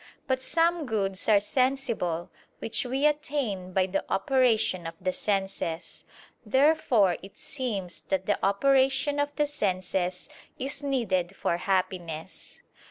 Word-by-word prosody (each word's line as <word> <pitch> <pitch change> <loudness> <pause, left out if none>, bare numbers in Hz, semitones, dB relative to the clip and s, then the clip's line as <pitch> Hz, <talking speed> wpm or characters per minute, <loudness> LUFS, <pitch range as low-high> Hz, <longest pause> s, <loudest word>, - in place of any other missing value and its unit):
But 260 -1 0
some 330 +2 +1
goods 195 -4 -1
are 210 -2 +7
sensible, 235 -8 -1 0.3
which 230 +3 -2
we 265 +4 0
attain 270 -11 0
by 185 0 +2
the 190 +1 -2
operation 215 -5 +2
of 165 - -7
the 185 - -1
senses. 195 -5 -2 0.4
Therefore 250 - +3
it 195 +1 -13
seems 210 -10 -4
that 190 -1 0
the 205 - 0
operation 270 +7 +3
of 290 0 +1
the 295 - +2
senses 185 -8 -2 0.3
is 275 +2 -3
needed 200 -10 0
for 170 - 0
happiness. 180 -3 -3
210 Hz, 125 wpm, -27 LUFS, 185-270 Hz, 0.4 s, are